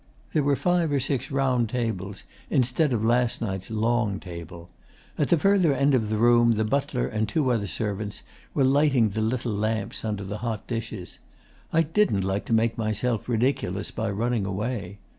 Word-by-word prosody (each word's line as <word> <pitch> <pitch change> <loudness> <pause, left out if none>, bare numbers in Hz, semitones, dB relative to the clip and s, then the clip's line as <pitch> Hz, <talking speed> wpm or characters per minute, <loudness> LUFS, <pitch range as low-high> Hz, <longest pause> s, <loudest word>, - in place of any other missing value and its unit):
There 155 - +3
were 140 0 +2
five 175 0 +1
or 140 - +2
six 130 -1 -1
round 130 -4 +1
tables, 110 -5 -3 0.3
instead 130 +4 +2
of 110 -3 0
last 120 +1 +2
night's 95 -4 -4
long 110 -2 0
table. 85 -1 -9 0.4
At - - 0
the 170 - +5
further 185 -4 +3
end 140 +1 +3
of 110 -5 +1
the 110 - 0
room 120 0 +5
the 110 +1 0
butler 135 +1 0
and 110 0 -2
two 130 +2 +1
other 110 -4 0
servants 105 0 -4 0.3
were 140 - +3
lighting 135 -4 +4
the 110 +2 -3
little 115 0 -1
lamps 110 0 -2
under 105 -3 -2
the 100 +2 -5
hot 115 -3 -3
dishes. 115 -6 -5 0.5
I 165 - +4
didn't 160 - +1
like 95 +1 -1
to - - -7
make 115 +1 +2
myself 110 +2 -1
ridiculous 110 -5 0
by 110 -1 -2
running 110 0 -1
away. 100 -1 -3
115 Hz, 180 wpm, -26 LUFS, 105-130 Hz, 0.5 s, the